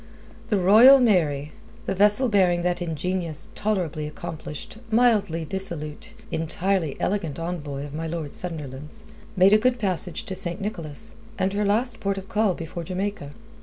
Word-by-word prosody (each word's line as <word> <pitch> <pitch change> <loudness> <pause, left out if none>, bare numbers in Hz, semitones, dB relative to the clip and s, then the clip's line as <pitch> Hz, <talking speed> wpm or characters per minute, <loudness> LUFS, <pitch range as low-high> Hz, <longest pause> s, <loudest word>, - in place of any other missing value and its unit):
The 210 - +2
Royal 220 +9 +8
Mary 155 - +2 0.3
the - - -1
vessel 210 +6 +4
bearing 180 -5 +3
that 175 0 0
ingenious, 170 -1 -3
tolerably 175 -8 -2
accomplished, 155 +3 -7
mildly 210 -8 +2
dissolute, 165 -5 -4 0.2
entirely 165 -1 0
elegant 175 -8 -1
envoy 155 -5 -4
of 145 - -9
my 160 +2 -3
Lord 160 -3 -4
Sunderland's 150 -4 -7 0.3
made 190 +2 +6
a 215 - +7
good 250 +2 +2
passage 185 -2 -2
to 215 -4 -5
St. 180 -2 -4
Nicholas, 195 0 -6 0.3
her 200 +2 0
last 225 +4 +1
port 200 0 -1
of 195 0 -7
call 210 -4 +2
before 165 +1 -6
Jamaica. 185 -4 -4
180 Hz, 145 wpm, -24 LUFS, 160-205 Hz, 0.3 s, Royal